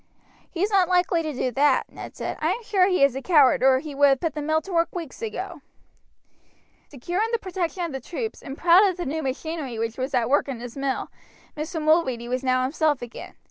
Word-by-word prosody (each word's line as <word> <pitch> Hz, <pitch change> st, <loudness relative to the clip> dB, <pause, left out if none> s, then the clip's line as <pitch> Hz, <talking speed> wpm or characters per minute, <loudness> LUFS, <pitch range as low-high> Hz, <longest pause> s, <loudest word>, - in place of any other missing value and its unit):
"He's 390 Hz, +5 st, -1 dB
not 380 Hz, -3 st, +3 dB
likely 360 Hz, -1 st, +2 dB
to 310 Hz, -1 st, -3 dB
do 255 Hz, -2 st, -2 dB
that," 280 Hz, +2 st, +2 dB
Ned -, -, -9 dB
said. -, -, -4 dB
"I -, -, +2 dB
am 475 Hz, -, -7 dB
sure 390 Hz, -4 st, +3 dB
he 365 Hz, -6 st, +2 dB
is 275 Hz, -2 st, +4 dB
a 270 Hz, -, -4 dB
coward 290 Hz, -5 st, +4 dB
or 260 Hz, 0 st, +5 dB
he 295 Hz, +2 st, -6 dB
would 285 Hz, +1 st, +5 dB
have 270 Hz, -2 st, +3 dB
put 330 Hz, +1 st, -2 dB
the 300 Hz, -, -4 dB
mill 315 Hz, +2 st, +1 dB
to 390 Hz, -, -8 dB
work 335 Hz, +1 st, +1 dB
weeks 335 Hz, -, -7 dB
ago." 450 Hz, -2 st, -5 dB, 1.3 s
Secure 345 Hz, -, -3 dB
in 450 Hz, -, 0 dB
the 465 Hz, -, +2 dB
protection 370 Hz, -3 st, -3 dB
of 335 Hz, -, -3 dB
the 270 Hz, -, -4 dB
troops, 440 Hz, +5 st, -5 dB
and 270 Hz, +1 st, -8 dB
proud 350 Hz, +3 st, +6 dB
of 370 Hz, -2 st, -2 dB
the 350 Hz, -, -4 dB
new 315 Hz, +4 st, -2 dB
machinery 275 Hz, -2 st, -4 dB
which 230 Hz, +2 st, -3 dB
was 260 Hz, +1 st, -2 dB
at 235 Hz, -2 st, +2 dB
work 285 Hz, +3 st, +2 dB
in 265 Hz, -4 st, -5 dB
his 240 Hz, 0 st, -8 dB
mill, 275 Hz, -1 st, -2 dB, 0.4 s
Mr. 320 Hz, +3 st, -4 dB
Mulready 305 Hz, -7 st, +1 dB
was 255 Hz, +2 st, -2 dB
now 255 Hz, -1 st, +2 dB
himself 295 Hz, 0 st, 0 dB
again. 240 Hz, -, -9 dB
305 Hz, 230 wpm, -24 LUFS, 265-355 Hz, 1.3 s, proud